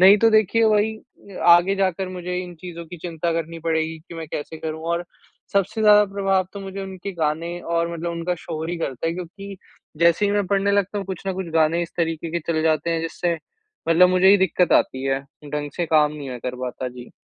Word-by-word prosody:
नहीं 195 +3 +9
तो 225 +1 +5
देखिए, 220 +1 +3
वही 215 0 +3
अ 200 -2 -15
आगे 175 +3 +6
जाकर 190 -1 0
मुझे 180 0 -4
इन 175 -1 -10
चीज़ों 170 -2 -7
की 175 - -9
चिंता 170 -1 -2
करनी 165 0 -3
पड़ेगी 160 0 0
कि 170 - -9
मैं 165 -1 -6
कैसे 160 +2 -5
करूँ 160 0 -5
और 170 +1 -1 0.5
सबसे 200 +3 +1
ज़्यादा 210 0 +7
प्रभाव 195 -2 +1
तो 200 - -7
मुझे 195 0 -6
उनके 190 +1 -6
गाने 165 +2 -1
और 170 0 -1
मतलब 170 +1 -3
उनका 170 +1 -2
शोर 160 0 -5
ही 175 - -2
करता 135 -1 -3
है 165 - +1
क्योंकि 195 +3 -8 0.4
जैसे 170 +4 +4
ही - - +1
मैं 205 -2 +1
पढ़ने 200 +1 +1
लगता 200 +1 +1
हूँ 195 - -5
कुछ 190 -3 -5
न 190 - 0
कुछ 190 -1 -4
गाने 165 +2 +3
इस 170 - -6
तरीके 165 -1 -1
के 170 0 -1
चले 155 0 0
जाते 160 +1 +1
हैं 165 - 0
जिससे 170 +1 -1 0.5
मतलब 180 +2 +6
मुझे 185 +1 +3
ही 200 - +8
दिक़्क़त 185 -1 +2
आती 130 +1 +2
है 135 0 0 0.2
ढंग 145 0 -4
से 175 -2 -1
काम 150 -1 +3
नहीं 145 -3 -7
मैं 125 -1 -6
कर 125 0 -4
पाता 125 0 -4
जी। 125 0 -11
170 Hz, 225 wpm, -23 LUFS, 160-195 Hz, 0.5 s, नहीं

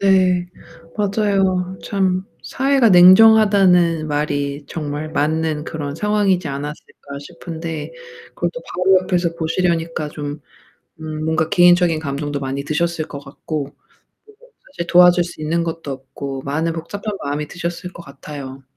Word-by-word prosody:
네, 185 -2 +3 0.5
맞아요. 195 -3 0
참 190 -1 0 0.2
사회가 270 -3 +2
냉정하다는 185 -4 +6
말이 145 -1 -2
정말 150 -1 -5
맞는 155 0 0
그런 145 -3 -5
상황이지 200 -3 +1
않았을까 145 +2 -7 0.2
싶은데 165 - -7 0.4
그것도 - - -3
바로 185 +1 +4
옆에서 175 -2 0
보시려니까 165 -2 -1
좀 145 0 -6 0.6
음 155 -1 -5
뭔가 160 0 0
개인적인 175 -2 +4
감정도 145 -1 -3
많이 135 0 -4
드셨을 160 +2 -1
것 - - -8
같고 140 0 -6 0.5
그리고 435 +4 -21 0.2
사실 170 -10 -5
도와줄 180 0 +6
수 170 -2 -9
있는 165 +2 0
것도 165 -3 -5
없고 135 +1 -7
많은 160 +4 -1
복잡한 200 +6 -5
마음이 145 +1 -3
드셨을 175 +1 -5
것 170 - -11
같아요. 140 -2 -9
165 Hz, 300 characters per minute, -19 LUFS, 150-185 Hz, 0.6 s, 냉정하다는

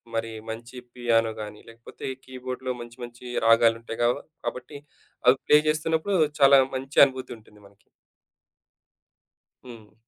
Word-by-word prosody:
మరి 115 0 -2 0.2
మంచి 115 +3 -8 0.2
పియానో 115 -2 +1
గాని, 105 0 -9
లేకపోతే 115 0 -10 0.2
కీబోర్డ్‌లో 130 0 -5
మంచి 120 +1 -11
మంచి 120 +1 -11 0.2
రాగాలు 115 0 +5
ఉంటాయిగా 115 +1 -1
వ - - -7 0.3
కాబట్టి, 125 +3 -5 0.5
అవి 125 +2 +7
ప్లే 150 - +6
చేస్తున్నప్పుడు 160 +5 0 0.2
చాలా 140 0 +8 0.2
మంచి 135 +2 -1
అనుభూతి 130 -1 -8
ఉంటుంది 105 -1 -21
మనకి. 100 0 -28 1.8
హ్మ్. 115 -4 -13
120 Hz, 125 wpm, -25 LUFS, 115-130 Hz, 1.8 s, చాలా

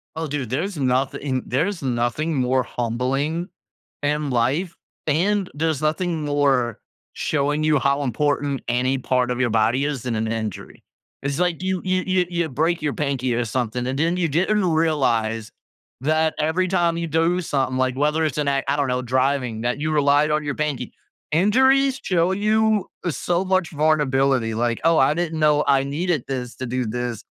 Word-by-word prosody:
Oh, 160 0 -3
dude, 140 -5 -3
there's 165 +8 -2
nothing 130 0 0
there's 170 +8 -1
nothing 130 +5 -1
more 130 0 +1
humbling 135 +10 -2 0.6
in 150 0 0
life, 135 +9 0 0.3
and 190 +6 +1
there's 155 -1 -1
nothing 160 0 -1
more 135 -5 +1 0.3
showing 145 +1 0
you 155 -2 +3
how 140 +1 +1
important 140 +1 0
any 130 +2 +1
part 125 -1 0
of 125 - -2
your 125 -2 +2
body 115 +5 +2
is 145 -5 -3
than 125 -2 -2
an 110 0 -1
injury. 110 -3 -5 0.4
It's 140 +2 -2
like 180 -1 0
you 185 -1 -1
you 185 0 +1
you 185 -1 +2
you 170 -2 -1
break 160 +5 0
your 150 -2 -1
pinky 135 -4 -1
or 120 0 0
something, 125 +1 -2
and 135 +1 -2
then 165 +4 +1
you 175 - +1
didn't 185 +7 +1
realize 130 -10 +1 0.5
that 155 +2 +1
every 160 +5 +1
time 170 -2 +1
you 170 - -2
do 165 +3 +1
something, 135 -5 -1
like, 130 -1 +1
whether 150 +2 +1
it's 155 - -2
an 145 - 0
a 140 0 0
I 140 - +1
don't 145 -2 0
know, 125 0 0
driving, 130 -2 0
that 120 +4 -1
you 155 +1 -1
relied 145 +1 +3
on 150 0 +1
your 145 -2 -3
pinky. 145 -5 -3 0.4
Injuries 265 - +3
show 180 0 +2
you 215 0 +2 0.2
so 175 +4 -1
much 185 -2 +1
vulnerability, 135 -6 +2
like, 120 0 -1
"Oh, 165 -1 +4
I 135 +3 +4
didn't 165 -1 -2
know 150 -1 +3
I 135 -1 +4
needed 155 +1 -1
this 125 -3 -4
to 130 - -4
do 125 0 -2
this 120 0 -4
145 Hz, 180 wpm, -22 LUFS, 130-165 Hz, 0.6 s, Oh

